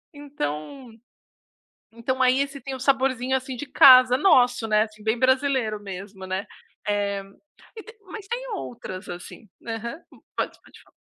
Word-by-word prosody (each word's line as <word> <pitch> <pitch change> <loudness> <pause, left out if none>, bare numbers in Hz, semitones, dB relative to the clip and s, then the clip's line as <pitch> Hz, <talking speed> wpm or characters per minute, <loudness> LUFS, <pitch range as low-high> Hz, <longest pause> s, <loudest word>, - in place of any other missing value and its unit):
Então 255 - -6 1.0
então 260 +3 -2
aí, 255 +1 +4
esse 280 0 -3
tem 270 +2 -6
o 260 - -8
saborzinho, 265 -1 +1
assim, 260 -1 -5
de 290 - -6
casa 255 -1 +8
nosso, 245 - +4
né, 215 0 +4
assim, 215 -1 -7
bem 220 +2 0
brasileiro 260 -4 +1
mesmo, 195 0 -8
né, 190 +2 -3 0.4
Eh, 200 -1 -1 0.5
e 435 - -8
tem 450 0 -15 0.2
mas 410 -2 -8
tem - - -4
outras, 220 - -7
assim. 180 +4 -9 0.2
Aham. 235 +6 -5 0.4
Pode - - -3
pode - - -18
falar. - - -27
250 Hz, 150 wpm, -24 LUFS, 215-270 Hz, 1.0 s, casa